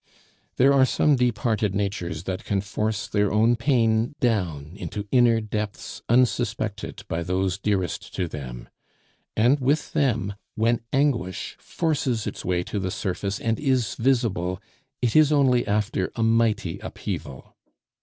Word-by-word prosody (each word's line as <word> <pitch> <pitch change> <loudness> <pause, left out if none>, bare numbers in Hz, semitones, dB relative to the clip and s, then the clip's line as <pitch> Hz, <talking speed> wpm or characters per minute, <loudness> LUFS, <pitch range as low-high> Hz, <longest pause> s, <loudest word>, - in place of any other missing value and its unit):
There 135 +2 +5
are 135 -1 +5
some 145 +2 +3
deep 125 -3 +1
hearted 110 -5 0
natures 95 -5 -2
that 95 +3 -4
can 100 -3 0
force 105 +1 -2
their 105 -1 +1
own 110 +3 +4
pain 115 -1 +1
down 90 - 0
into 105 0 -5
inner 120 -3 +5
depths 105 -1 -5
unsuspected 110 -4 0
by 85 -2 -2
those 95 +2 -1
dearest 95 -5 -1
to 90 - -1
them; 60 -6 -7 0.7
and 125 +6 +4
with 140 +4 0
them, 120 -9 +1 0.2
when 115 +2 +1
anguish 135 -11 0
forces 135 -9 -1
its - - -5
way 90 -1 0
to 100 - -4
the 95 -1 -2
surface 100 +1 -3
and 115 -1 -1
is 130 -8 +1
visible, 110 -8 0 0.4
it 120 - +1
is 155 -1 +6
only 130 -4 +3
after 105 -2 0
a 115 - 0
mighty 110 -6 +1
upheaval. 65 -2 -6
110 Hz, 145 wpm, -24 LUFS, 95-120 Hz, 0.7 s, is